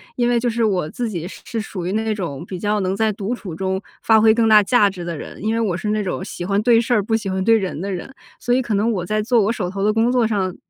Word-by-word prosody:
因 240 -1 +1
为 240 -1 +2
就 240 +1 0
是 230 0 -1
我 185 -7 0
自 240 +7 -3
己 175 -5 -4
是 - - -11
是 230 - -4
属 185 -4 -6
于 180 - -2
那 220 +1 -1
种 170 -6 -5
比 185 - -5
较 210 +3 0
能 190 -1 -1
在 220 +1 +1
独 210 +3 -3
处 195 -8 -8
中 190 +3 -2 0.2
发 220 -1 +4
挥 220 0 +6
更 225 0 +2
大 215 -1 +7
价 210 -1 +4
值 185 -3 -7
的 170 -2 -4
人。 145 - -9
因 220 +1 0
为 230 - 0
我 210 -6 0
是 210 +4 -3
那 215 0 0
种 190 -1 -3
喜 175 -2 -6
欢 200 +2 +1
对 230 0 +5
事 240 +1 0
儿， 215 -4 +2
不 225 +2 +1
喜 210 -3 -5
欢 190 0 -1
对 225 +2 +5
人 190 -6 -3
的 200 +1 -3
人， 185 +8 -6 0.3
所 245 - +1
以 260 - +2
可 235 -4 -2
能 210 +3 +1
我 180 -4 -3
在 215 +3 0
做 230 +2 +2
我 205 +2 +1
手 195 -6 -3
头 195 +1 -4
的 210 - +3
工 225 +2 +2
作 245 -2 +2
上 190 -4 -1
210 Hz, 335 characters per minute, -20 LUFS, 190-225 Hz, 0.3 s, 大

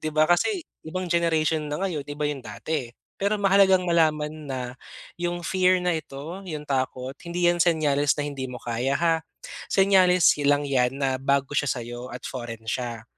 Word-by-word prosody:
'di 155 - -2
ba, 155 0 +3
kasi 330 - +1 0.2
ibang 185 +3 -3
generation 160 -3 +1
na 150 - -2
ngayon, 175 -6 -2
iba 145 +1 -3
'yong 145 -2 -2
dati. 125 +4 -4 0.3
Pero 200 +2 +1
mahalagang 195 -2 +4
malaman 155 -3 +2 0.2
na 130 -1 -3 0.6
'yong 175 0 -2
fear 185 0 +2
na 180 - +2
ito, 155 +3 -6
'yong 150 -2 -5
takot, 130 -2 -2 0.2
hindi 175 +1 -1
'yan 175 0 +3
senyales 150 -4 +2
na 145 - -2
hindi 135 -3 -4
mo 125 - -7
kaya, 120 +3 -1
ha? 165 +1 +2 0.5
Senyales 185 -3 +5
hi 145 - +1
lang 145 0 +3
'yan 130 -2 +1
na 135 -2 -1
bago 140 +1 +1
siya 145 0 +1
sa'yo 120 0 -4
at 125 +1 -9
foreign 115 -3 -6
siya. 115 0 -4
150 Hz, 180 wpm, -25 LUFS, 135-175 Hz, 0.6 s, Senyales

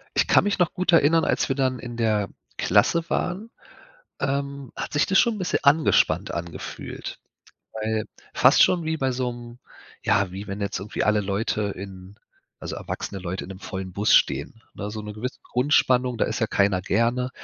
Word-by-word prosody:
Ich - - +3
kann - - +5
mich 205 -1 0
noch 175 - +2
gut 180 -1 0
erinnern, 165 0 +5
als - - +1
wir 135 - +1
dann 130 -2 0
in 120 -1 -7
der 110 -3 +1 0.3
Klasse 170 0 +2
waren, 190 +6 -2 0.7
ähm, 140 -1 -3
hat - - -5
sich 145 - +4
das 190 - +3
schon 235 - +4
'n - - -6
bisschen 180 -2 0
angespannt 150 +2 +3
angefühlt. 85 -1 -6 0.5
Weil 110 0 -2 0.3
fast - - +6
schon 175 -2 +3
wie 160 0 -1
bei 135 -2 +1
so 125 -1 -2
'nem 120 0 -11 0.4
ja, 100 -2 +2
wie 100 +2 -7
wenn 100 +1 -5
jetzt 100 -1 -2
irgendwie 100 +3 -4
alle 105 -1 +3
Leute 105 +2 -1
in 95 0 -10 0.5
also, - - -5
erwachsene 95 -2 -5
Leute 95 +1 -4
in - - -10
'nem 95 -1 -8
vollen 95 -2 -6
Bus 105 +1 +3
stehen, 70 +11 +2
ne? 105 - -5
So 110 0 -5
'ne 105 0 -7
gewisse 125 +5 -5
Grundspannung, 125 -2 +2
da - - +2
ist - - -3
ja 110 - +2
keiner 100 -3 +1
gerne. 120 +6 +1
115 Hz, 190 wpm, -24 LUFS, 100-140 Hz, 0.7 s, fast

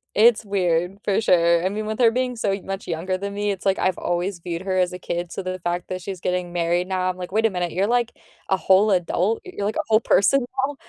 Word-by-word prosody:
It's 220 0 +5
weird, 180 -1 0
for 200 - +1
sure. 170 -4 +3
I - - +2
mean, 215 +2 -4
with 220 - -3
her 235 -2 +5
being 250 +1 -1
so 220 -3 -1
y 195 - -2
much 195 0 -5
younger 180 +3 -2
than 200 +1 -5
me, 205 +1 -1
it's, 195 -2 -4
like, 195 0 +2
I've 185 -1 +1
always 175 +2 -2
viewed 170 0 -5
her 190 -1 -2
as 180 -1 +1
a 180 - -6
kid, 175 -1 -4
so, - - -4
the 185 0 -4
fact 175 +1 -3
that 185 0 -4
she's 190 -1 -6
getting 180 -1 -2
married 175 +1 0
now, 185 -1 0
I'm, 185 - -4
like, 180 0 -7
"Wait 220 +2 +3
a - - -2
minute, 180 -3 -2
you're 195 +3 0
like, 240 0 +1 0.4
a 190 - +3
whole 195 +3 +4
adult; 185 +4 +1
y 370 - -11
you're 200 - -1
like 215 - -1
a - - -1
whole 220 -1 +4
person 245 +4 +3 0.2
now." 290 - -7
190 Hz, 270 wpm, -23 LUFS, 180-210 Hz, 0.4 s, It's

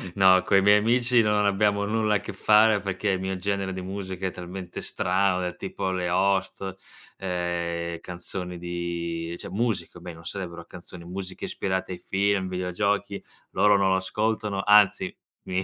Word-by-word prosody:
no, 95 -1 +6
coi 95 0 +4
miei 105 +1 +6
amici 120 +2 +3
non 105 -1 +2
abbiamo 100 0 +2
nulla 105 0 +1
a - - +2
che - - -7
fare 105 0 +5
perché 100 +1 -2
il 95 -1 +1
mio 95 0 -3
genere 100 0 -2
di 95 0 -5
musica 95 -1 -5
è 95 - -1
talmente 90 0 -7
strano, 95 0 +1
del 90 -1 -3
tipo 95 -1 -3
le 90 -1 -1
host, 95 +1 0 0.4
ehm, 85 -2 -2
canzoni 90 0 -5
di 85 -1 -4
cioè - - -8
musica 110 -4 -2
almeno, 85 -2 -10
sarebbero 85 -2 -6
canzoni, 90 -1 -11
musiche 95 +1 -6
ispirate 95 -1 -2
ai 90 - -5
film, 100 +1 0
videogiochi, 95 +3 -1 0.3
loro 105 -1 +4
non 95 -1 +2
lo 95 - +3
ascoltano, 105 +1 -1
anzi 105 -1 +5 0.3
mi 95 0 -1
95 Hz, 160 wpm, -26 LUFS, 90-100 Hz, 0.4 s, no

